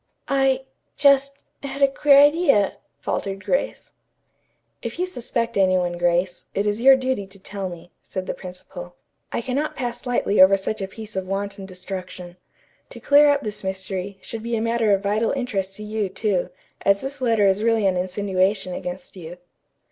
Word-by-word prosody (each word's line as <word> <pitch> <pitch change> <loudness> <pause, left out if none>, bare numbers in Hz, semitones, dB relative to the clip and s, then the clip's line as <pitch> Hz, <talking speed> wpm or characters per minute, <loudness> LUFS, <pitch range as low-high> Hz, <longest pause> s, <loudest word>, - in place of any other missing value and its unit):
"I 270 -1 +2 0.3
just 275 -1 +3 0.2
had 275 0 -3
a - - +8
queer 275 +1 +4
idea," 285 - +4 0.2
faltered 195 0 -3
Grace. - - -1 0.9
"If - - -5
you 360 - 0
suspect 235 -8 -3
any 185 -1 +4
one, 175 -1 -2
Grace, 175 +1 0
it 200 - 0
is 210 +2 -1
your 270 +1 +8
duty 260 -6 -2
to 195 +1 -13
tell 195 0 -5
me," 175 0 -11
said 185 -1 -5
the - - -3
principal. 180 -1 -10 0.4
"I - - -1
cannot 275 +5 -2
pass 245 -1 -5
lightly 225 -5 +2
over 195 +1 +7
such 195 +2 -4
a 195 - -2
piece 215 +1 -10
of 190 -1 -3
wanton 195 0 -4
destruction. 185 -1 -8 0.5
To - - -10
clear 290 +1 +6
up 285 -1 +2
this 210 -1 -5
mystery, 190 0 -4
should 225 - -6
be 235 +1 -2
a - - 0
matter 230 -1 +1
of 195 0 +2
vital 210 +3 +1
interest 200 -8 -2
to 210 - -8
you, 210 -2 -2
too, 190 -2 -1 0.3
as 200 0 +3
this 270 0 -6
letter 225 -4 +3
is 195 +1 +3
really 225 -2 +2
an 190 -1 +3
insinuation 185 +1 0
against 180 +1 -6
you." 175 -1 -9
205 Hz, 180 wpm, -23 LUFS, 190-250 Hz, 0.9 s, a